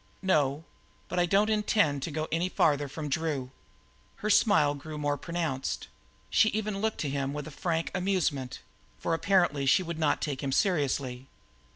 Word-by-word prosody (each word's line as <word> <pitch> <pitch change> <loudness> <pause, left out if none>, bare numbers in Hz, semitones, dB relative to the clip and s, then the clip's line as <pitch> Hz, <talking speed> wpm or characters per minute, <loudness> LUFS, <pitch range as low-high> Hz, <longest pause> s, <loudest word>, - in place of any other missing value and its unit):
"No, 150 -5 +2 0.5
but 180 - -1
I 175 - +3
don't 205 +4 +3
intend 205 -9 +2
to 165 - -3
go 155 +1 -3
any 170 +3 0
farther 145 -5 +2
from 150 +2 -6
Drew." 140 -3 -2 0.6
Her 215 - -1
smile 175 -10 +4
grew 150 +2 -8
more 145 -1 0
pronounced; 155 -3 -3 0.4
she 220 - +5
even 210 -2 -2
looked 220 0 0
to 145 - -1
him 140 0 -2
with 150 0 -5
a 155 - -8
frank 165 +2 -2
amusement, 180 -9 -1 0.4
for - - -2
apparently 165 -6 +2
she 185 - +5
would 170 -2 -5
not 155 -2 +2
take 140 -4 -3
him 140 - -2
seriously. 135 -6 0
155 Hz, 170 wpm, -29 LUFS, 140-185 Hz, 0.6 s, she